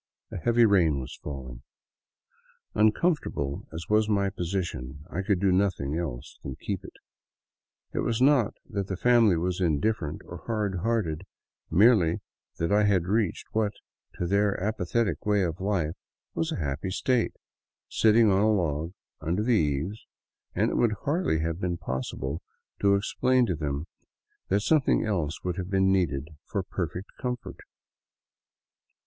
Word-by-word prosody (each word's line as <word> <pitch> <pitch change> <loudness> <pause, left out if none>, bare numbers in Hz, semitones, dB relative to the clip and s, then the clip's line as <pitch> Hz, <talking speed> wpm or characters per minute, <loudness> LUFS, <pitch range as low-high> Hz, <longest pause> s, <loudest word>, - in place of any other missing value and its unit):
A - - -4
heavy 120 +4 +4
rain 85 -9 +4
was 65 - -6
falling. 65 -4 -7 1.1
Uncomfort 130 +11 +3
able 70 -1 -3
as 80 +1 -6
was 110 0 +3
my 100 -2 +2
position, 80 -7 -4
I 95 - -2
could 95 -1 +1
do 95 0 +3
nothing 90 -7 +1
else 70 -6 -5
than 65 - -6
keep - - -4
it. - - -11 1.0
It - - -1
was 115 0 0
not 130 -4 +4
that 100 -2 -3
the 95 - -3
family 115 -5 +5
was 90 +2 -1
indifferent 85 0 0
or - - -8
hard 105 -5 -1
hearted, 95 -5 -1 0.4
merely 100 -5 +5 0.4
that 85 +2 -1
I 105 +1 +4
had 95 -4 +3
reached 105 0 0
what, 110 -1 +1 0.4
to 90 - -2
their 100 +2 +2
apathetic 110 +2 -1
way 105 -2 +2
of 85 0 -3
life, 95 -6 0 0.4
was 165 0 -1
a - - -1
happy 70 +3 -2
state, 120 +5 +1 0.3
— - - -67
sitting 110 -1 +6
on 95 +1 +3
a 110 +1 +4
log 85 -4 0 0.3
under 85 +7 -1
the 125 - +1
eaves, 80 +3 0 0.5
and - - +2
it - - -1
would 115 -3 +3
hardly 145 - +1
have 85 +1 -2
been 90 -1 -1
possible 65 +3 -4 0.4
to 100 0 +4
explain 125 +5 +2
to 90 -6 -1
them 75 -1 -3 0.6
that 100 +2 +2
something 145 +1 +3
else 85 -8 -2
would 90 0 -2
have 90 -1 -4
been 95 -1 +3
needed 80 -6 0 0.2
for 100 - -2
per 90 -1 -2
fect 90 +4 -7
comfort. 125 -2 -4
95 Hz, 155 wpm, -27 LUFS, 80-110 Hz, 1.1 s, sitting